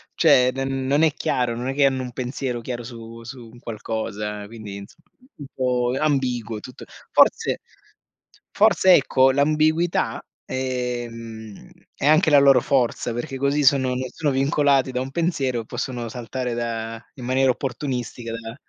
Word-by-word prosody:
cioè 130 Hz, -6 st, +5 dB
d 135 Hz, -, -7 dB
non 135 Hz, +2 st, 0 dB
è 155 Hz, -3 st, +4 dB
chiaro, 120 Hz, -2 st, -1 dB
non 125 Hz, +2 st, -4 dB
è -, -, -1 dB
che 140 Hz, 0 st, +3 dB
hanno 130 Hz, -1 st, +1 dB
un 125 Hz, -, -6 dB
pensiero 125 Hz, -1 st, -3 dB
chiaro 120 Hz, 0 st, -5 dB
su 115 Hz, -1 st, -10 dB
su 120 Hz, -1 st, -10 dB
un 120 Hz, -, -15 dB
qualcosa, 105 Hz, -2 st, -4 dB
quindi 110 Hz, -3 st, -9 dB
insomma 100 Hz, +11 st, -14 dB, 0.3 s
un 145 Hz, -, -8 dB
po' 125 Hz, -1 st, 0 dB
ambiguo 125 Hz, -7 st, 0 dB
tutto. 125 Hz, +3 st, -11 dB, 0.3 s
Forse -, -, +3 dB, 0.9 s
forse 185 Hz, -1 st, +5 dB
ecco, 135 Hz, -2 st, +4 dB
l'ambiguità, 155 Hz, +4 st, +1 dB, 0.2 s
ehm, 120 Hz, -4 st, -5 dB, 0.2 s
è -, -, -4 dB
anche 155 Hz, +2 st, +5 dB
la 145 Hz, -1 st, +7 dB
loro 135 Hz, -3 st, +6 dB
forza, 120 Hz, -3 st, 0 dB
perché 135 Hz, +3 st, -4 dB
così 140 Hz, +2 st, +1 dB
sono 130 Hz, -2 st, +4 dB
non 125 Hz, -, -1 dB, 0.2 s
sono 150 Hz, -3 st, 0 dB
vincolati 135 Hz, -1 st, +2 dB
da 125 Hz, 0 st, -2 dB
un 135 Hz, +1 st, -5 dB
pensiero, 135 Hz, -8 st, -1 dB
e -, -, -12 dB
possono 120 Hz, -1 st, -4 dB
saltare 125 Hz, +1 st, -4 dB
da 115 Hz, -1 st, -4 dB
in 125 Hz, -3 st, -8 dB
maniera 130 Hz, +1 st, +3 dB
opportunistica 125 Hz, -3 st, -4 dB
da 115 Hz, 0 st, -7 dB
125 Hz, 155 wpm, -23 LUFS, 115-135 Hz, 0.9 s, la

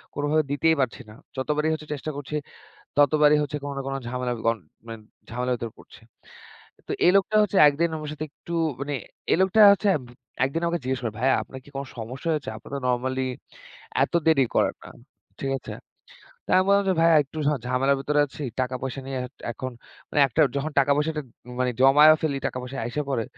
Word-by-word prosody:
কোনভাবে 145 Hz, +2 st, +1 dB
দিতেই 160 Hz, +3 st, +3 dB
পারছি 130 Hz, -1 st, -2 dB
না। 105 Hz, -, -12 dB, 0.2 s
যতবারই 150 Hz, +3 st, 0 dB
হচ্ছে 155 Hz, -1 st, -6 dB
চেষ্টা 150 Hz, +2 st, -5 dB
করছি, 145 Hz, +1 st, -5 dB, 0.6 s
ততবারই 150 Hz, +1 st, +5 dB
হচ্ছে 150 Hz, 0 st, -3 dB
কোন 145 Hz, -, -4 dB
না -, -, -2 dB
কোন 135 Hz, -, -3 dB
ঝামেলা 125 Hz, 0 st, -2 dB
গন 115 Hz, 0 st, +2 dB, 0.3 s
মেন্ট 115 Hz, -1 st, -8 dB, 0.3 s
ঝামেলার 125 Hz, +2 st, -1 dB
ভিতর 115 Hz, -1 st, -5 dB
পড়ছে। -, -, -16 dB, 0.9 s
তো -, -, -2 dB
এই 180 Hz, -, +6 dB
লোকটা 195 Hz, +2 st, +2 dB
হচ্ছে 210 Hz, -1 st, -1 dB
একদিন 155 Hz, +4 st, +1 dB
আমার 155 Hz, -1 st, -6 dB
সাথে 150 Hz, +1 st, -5 dB
একটু 170 Hz, +3 st, -8 dB, 0.3 s
মানে 145 Hz, +1 st, -3 dB, 0.4 s
এই -, -, +5 dB
লোকটা 190 Hz, +3 st, +3 dB
হচ্ছে 200 Hz, +1 st, +1 dB, 0.2 s
ভু 120 Hz, -, -15 dB, 0.3 s
একদিন 140 Hz, +5 st, -1 dB
আমাকে 170 Hz, 0 st, -1 dB
জিজ্ঞেস 130 Hz, 0 st, -1 dB
করে 115 Hz, -3 st, -2 dB
"ভাইয়া 130 Hz, +3 st, +3 dB
আপনার 130 Hz, -, -10 dB
কি -, -, -16 dB
কোন 135 Hz, -, -3 dB
সমস্যা 125 Hz, +7 st, -6 dB
হয়েছে? 150 Hz, -2 st, -3 dB
আপনি -, -, -13 dB
তো -, -, -2 dB
নরমালি 130 Hz, +1 st, 0 dB, 0.8 s
এত -, -, -8 dB
দেরি 155 Hz, -5 st, +5 dB
করেন -, -, +2 dB
না।" -, -, -11 dB, 0.5 s
ঠিক 135 Hz, -, -2 dB
আছে? -, -, -9 dB, 0.7 s
তো -, -, -33 dB
আমি 185 Hz, -, +4 dB
বললাম 200 Hz, 0 st, +4 dB
যে, -, -, +4 dB
"ভাইয়া 165 Hz, -1 st, +6 dB
একটু 145 Hz, +3 st, -10 dB
ঝা 150 Hz, -, +3 dB
ঝামেলার 135 Hz, +2 st, +2 dB
ভিতরে 150 Hz, +2 st, +1 dB
আছি। 145 Hz, -, -10 dB, 0.2 s
টাকা 130 Hz, 0 st, -1 dB
পয়সা 135 Hz, 0 st, -4 dB
নিয়ে 135 Hz, -1 st, -3 dB
এট -, -, -18 dB, 0.2 s
এখন 130 Hz, +3 st, -5 dB, 0.4 s
মানে 145 Hz, -, +2 dB
একটার 150 Hz, +4 st, +3 dB
যখন 145 Hz, +3 st, -2 dB
টাকা 140 Hz, +1 st, +1 dB
পয়সাটা 155 Hz, +1 st, -1 dB, 0.4 s
মানে 125 Hz, 0 st, +2 dB
জমায়ে 145 Hz, +4 st, +8 dB
ফেলি 145 Hz, -3 st, 0 dB
টাকা -, -, -4 dB
পয়সা 125 Hz, +2 st, -7 dB
আইসা 120 Hz, +6 st, -2 dB
পড়ে 115 Hz, -4 st, 0 dB
140 Hz, 200 wpm, -25 LUFS, 130-155 Hz, 0.9 s, জমায়ে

